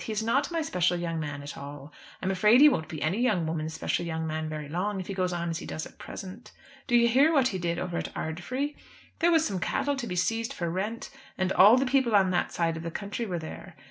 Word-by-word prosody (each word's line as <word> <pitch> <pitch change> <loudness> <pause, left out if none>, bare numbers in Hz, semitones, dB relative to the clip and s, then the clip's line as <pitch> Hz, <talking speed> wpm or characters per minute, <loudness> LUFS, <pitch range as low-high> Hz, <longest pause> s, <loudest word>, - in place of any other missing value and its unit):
He - - -5
is 215 0 -1
not 275 +5 +1
my 335 -2 -1
special 180 - +1
young 165 -1 -3
man 145 -2 -5
at 145 - -7
all. 140 0 -9 0.3
I'm 190 - +1
afraid 210 +6 +5
he 295 - +9
won't 160 - +1
be 155 - -5
any 170 +8 0
young 205 -10 +2
woman's 160 0 -3
special 165 - -1
young 160 -1 -3
man 155 0 -3
very 155 -1 -5
long, 190 +6 -2
if 185 - -5
he 195 - -5
goes 185 -1 0
on 170 -1 -2
as 165 - -3
he - - -8
does 155 - -4
at - - -15
present. 195 +4 -9 0.4
Do 240 - +2
you 235 0 +6
hear 270 +7 +5
what 270 -5 +3
he 190 - -3
did 170 -1 -1
over 175 -1 -2
at - - -5
Ardfry? 250 - -3 0.5
There 335 - +4
was 325 -1 +4
some 195 -3 -2
cattle 285 +10 0
to 245 -3 -4
be 180 - -3
seized 225 +6 0
for 170 -2 -3
rent, 210 +6 -3 0.3
and 185 0 0
all 210 +6 +8
the 265 - +2
people 255 -4 +2
on 190 -2 +4
that 175 - 0
side 165 -1 0
of - - -6
the 170 - -4
country 205 +6 -4
were 180 -3 -2
there. 160 -1 -8
185 Hz, 265 wpm, -28 LUFS, 165-230 Hz, 0.5 s, he